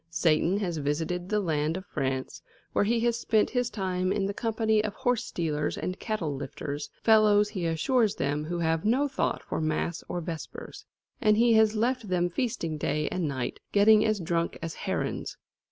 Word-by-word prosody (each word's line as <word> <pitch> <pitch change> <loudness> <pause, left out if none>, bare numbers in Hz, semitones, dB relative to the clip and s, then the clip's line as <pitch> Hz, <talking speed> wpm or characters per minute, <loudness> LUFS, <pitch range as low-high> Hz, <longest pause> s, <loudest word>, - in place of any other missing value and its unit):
Satan 165 +3 +2
has 180 -5 -2
visited 160 +5 -2
the 210 - +2
land 160 -3 0
of 190 - -8
France, 130 -4 -3 0.3
where - - +2
he 230 +2 +1
has 235 0 +1
spent 215 -3 +2
his 245 -1 0
time 185 -2 -1
in 200 -1 0
the 200 - -2
company 220 -1 +1
of 210 -1 -3
horse 245 -2 0
stealers 150 -3 -2
and 185 +1 -4
cattle 200 -10 -2
lifters, 140 +1 -5
fellows, 210 -2 +5
he 185 -6 -2
assures 215 +7 +2
them, 145 +2 -1
who 175 +2 -3
have 165 -1 0
no 255 +7 +2
thought 270 -1 -1
for - - -3
mass 155 +2 -1
or 175 - -2
vespers; 165 -1 -7 0.4
and 215 -1 +4
he 235 0 +5
has 220 0 +4
left 235 +1 0
them 175 -1 +1
feasting 170 - -2
day 150 0 0
and 180 -4 -1
night, 130 -3 -3
getting 210 +1 +6
as 215 -2 +1
drunk 170 -1 -1
as 165 -1 -5
herons. - - -3
185 Hz, 185 wpm, -28 LUFS, 160-220 Hz, 0.4 s, getting